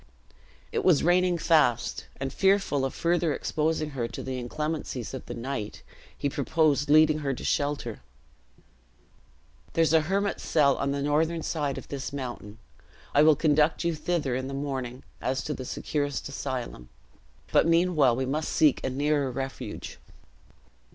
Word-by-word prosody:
It - - -1
was 170 -7 +4
raining 180 +1 +3
fast; 155 -8 +2
and 135 -1 -3
fearful 190 -8 +2
of 135 - -2
further 170 -2 +1
exposing 155 0 -1
her 125 -4 -2
to - - -7
the 130 -1 -4
inclemencies 150 -1 -4
of 130 - -6
the 120 - -5
night, 115 -3 -5 0.3
he - - -1
proposed 145 +1 +1
leading 155 0 +5
her 140 -3 -2
to - - -8
shelter. 140 -6 -1 1.7
"There 165 - +3
is 160 -1 +2
a 160 - +6
hermit's 195 +5 -1
cell 140 -4 +3
on 140 - -1
the 140 0 -1
northern 160 +3 +1
side 145 -4 -2
of - - -8
this 140 -2 -4
mountain. 120 -6 -6 0.6
I 145 - +5
will 155 0 +6
conduct 150 +2 +2
you 170 0 +1
thither 155 -4 -1
in 130 +1 -2
the 135 - -5
morning 130 -3 -4 0.2
as 130 -1 -1
to 150 - -3
the 130 - -6
securest 145 +1 -2
asylum; 125 - -5 0.6
but - - +4
meanwhile 165 -7 +4
we 130 +2 -1
must 150 +4 -2
seek 150 -4 +3
a - - 0
nearer 145 +1 0
refuge." 135 +1 -6
145 Hz, 160 wpm, -27 LUFS, 130-160 Hz, 1.7 s, a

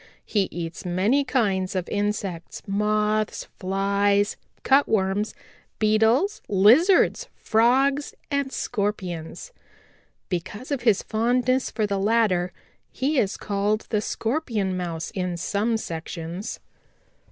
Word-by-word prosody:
He 200 -3 +1
eats 165 -1 -6
many 195 +11 +2
kinds 200 -8 0
of 185 -2 -2
insects, 205 -4 -3
Moths, 210 +1 0 0.2
Flies, 200 +2 +1 0.3
Cutworms, 210 -6 +2 0.4
Beetles, 225 - +2
Lizards, 275 - +5
Frogs 265 +6 +2 0.2
and 280 -1 0
Scorpions. 200 - -3 0.8
Because 205 - -5
of 280 -4 -1
his 225 -5 +3
fondness 245 +3 +1
for 220 - -1
the 200 -1 -1
latter 195 -4 +2 0.4
he 275 +2 0
is 200 -3 0
called 205 +1 -1
the 210 - +1
Scorpion 225 -7 -1
Mouse 170 -3 -4
in 180 -4 -3
some 205 +6 0
sections. 170 +1 -6
210 Hz, 105 wpm, -24 LUFS, 190-235 Hz, 0.8 s, Lizards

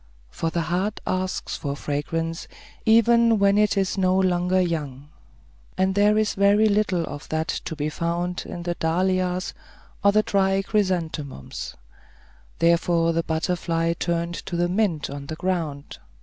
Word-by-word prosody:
For 165 - -2
the 170 +1 -1
heart 180 +6 -1
asks 185 0 -2
for 140 -3 -4
fragrance, 165 +3 -3 0.4
even 230 0 +5
when 200 0 +4
it 210 -1 +2
is 195 0 0
no 185 0 +3
longer 185 0 +2
young; 150 -6 -2 0.7
and 190 0 +2
there 205 +2 +4
is 215 -1 +1
very 200 +2 +4
little 200 -5 +1
of 145 -1 -8
that 160 0 -1 0.2
to 160 - -4
be 150 0 -2
found 170 +3 -2
in 175 - -6
the 175 0 -1
dahlias 180 +2 0 0.5
or 200 - +6
the 215 +1 +3
dry 195 -1 +1
chrysanthemums; 170 - -2 0.8
therefore 170 0 +3
the 165 - +1
butterfly 165 0 -1
turned 170 0 -2
to 175 - -3
the 175 0 +1
mint 180 -5 0
on 140 0 -7
the 155 - -4
ground. 160 -5 -3
175 Hz, 150 wpm, -24 LUFS, 165-195 Hz, 0.8 s, or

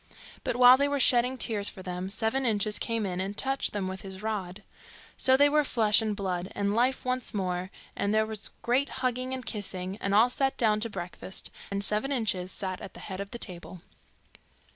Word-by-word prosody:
But - - -1
while 250 +1 +8
they 280 +1 +2
were 285 0 -1
shedding 250 0 +3
tears 210 -5 0
for 185 - -11
them, 180 +1 -4
Seven 225 +6 0
Inches 215 -3 +1
came 230 -2 -1
in, 180 -2 -3
and 195 +2 -3
touched 270 0 0
them 200 -2 -2
with 190 -1 -5
his 190 +1 -8
rod. 210 -2 -4 0.5
So 260 0 +4
they 285 +1 +6
were 300 +1 +3
flesh, 220 -5 +4
and 215 -2 -1
blood, 185 -2 -3
and 200 0 0
life 250 +4 +1
once 255 -3 -2
more, 185 -2 -2 0.3
and 200 - 0
there 220 0 +3
was 220 -1 -4
great 260 +4 +2 0.2
hugging 255 +1 -1
and 260 -1 -4
kissing, 190 -3 -4
and 195 -1 -1
all 235 +4 +5
sat 270 +1 +1
down 215 -3 +2
to 230 +2 0
breakfast, 185 -1 -4 0.2
and 200 0 -2
Seven 215 +7 +1
Inches 210 -8 0
sat 190 -3 -4
at 195 - -9
the - - -9
head 190 -2 -7
of 200 0 -5
the 235 - -6
table. 180 -4 -7
210 Hz, 205 wpm, -28 LUFS, 190-250 Hz, 0.5 s, while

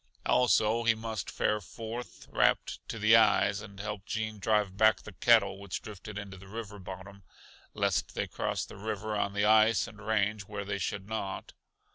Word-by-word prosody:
Also 115 -1 +3
he 115 -1 +4
must 110 -2 -4
fare 105 0 0
forth, 115 +5 -8
wrapped - - +2
to - - -4
the 110 +1 +6
eyes, 105 -2 +4
and 100 0 -11
help 105 -1 -5
Gene 110 -1 -3
drive 105 -2 +1
back 110 +2 +4
the 110 - -9
cattle 100 -2 +4
which 100 -3 -5
drifted 105 0 -8
into 100 -2 -7
the 95 +1 -13
river 105 -1 -7
bottom, 95 +1 -9 0.5
lest - - 0
they - - 0
cross - - -2
the - - -12
river 110 +1 -3
on 100 -1 0
the 100 0 +1
ice 110 +1 +5
and 110 -2 -12
range 105 -1 +1
where 100 -1 -5
they 100 0 -3
should 100 +1 -3
not. 105 -3 -4
105 Hz, 180 wpm, -30 LUFS, 100-110 Hz, 0.5 s, the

